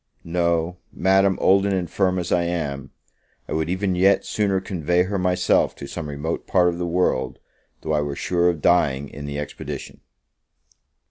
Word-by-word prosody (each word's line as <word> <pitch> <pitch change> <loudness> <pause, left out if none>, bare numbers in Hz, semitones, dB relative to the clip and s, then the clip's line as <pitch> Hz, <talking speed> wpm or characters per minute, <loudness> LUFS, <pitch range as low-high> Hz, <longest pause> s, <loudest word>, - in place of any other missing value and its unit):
no, 85 0 0
Madam, 95 0 +3
old 95 +1 +4
and 100 -1 +1
infirm 95 +1 0
as 90 -1 -3
I 90 - +3
am, 75 -6 -3 0.6
I - - -4
would 80 +1 -1
even 95 +1 0
yet 95 +2 +3
sooner 100 -3 0
convey 90 -2 0
her 95 +1 -2
myself 90 0 +2
to - - -8
some 75 +1 -6
remote 75 +3 -4
part 90 -2 +4
of 85 0 -4
the 90 - -1
world, 85 -7 0 0.4
though 80 - -2
I 75 - +2
were 70 -1 -3
sure 90 +2 +1
of 80 -4 -3
dying 70 -6 +2
in 70 +1 -8
the 70 0 -4
expedition. 75 0 -6
90 Hz, 175 wpm, -23 LUFS, 75-95 Hz, 0.6 s, old